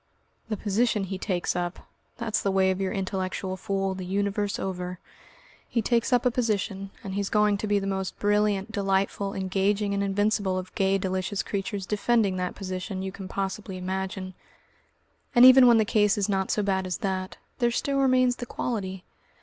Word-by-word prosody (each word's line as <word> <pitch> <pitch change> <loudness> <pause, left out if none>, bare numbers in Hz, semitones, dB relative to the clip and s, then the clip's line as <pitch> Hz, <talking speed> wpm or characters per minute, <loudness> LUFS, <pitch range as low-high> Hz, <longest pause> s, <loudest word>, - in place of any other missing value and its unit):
The 215 - -1
position 215 +1 +1
he 190 0 -4
takes 180 -4 -1
up! 175 0 -4 0.3
That's 230 -2 -1
the 200 - 0
way 190 -1 +3
of 190 +1 -2
your 190 - -1
intellectual 190 -1 -3
fool, 195 0 -1
the 190 0 -6
Universe 200 +2 -1
over. 180 -1 -4 0.7
He 230 - 0
takes 235 +3 +1
up 245 -1 +3
a 250 - +4
position, 200 -5 -1
and 195 - -5
he's 200 0 -1
going 210 -1 +3
to 215 - -3
be 205 0 +2
the 195 - -2
most 190 -1 -3
brilliant, 205 0 +1
delightful, 195 -1 0
engaging 195 +2 0
and 200 - 0
invincible 200 -1 +1
of 185 0 -6
gay 195 0 +2
delicious 190 +1 -2
creatures 200 -1 -3
defending 210 -1 +1
that 180 0 -2
position 185 0 -4
you 190 - -3
can 190 0 -8
possibly 195 0 -4
imagine. 185 0 -4 1.0
And 240 +1 +9
even 260 0 +9
when 235 -1 +7
the 220 - +3
case 210 0 +3
is 200 - +1
not 195 -2 0
so 210 - +1
bad 190 -1 0
as 180 - -2
that, 185 0 -3 0.2
there 240 -1 +3
still 275 +3 0
remains 255 -2 +3
the 245 - -6
quality. 190 -7 -3
195 Hz, 180 wpm, -26 LUFS, 190-210 Hz, 1.0 s, And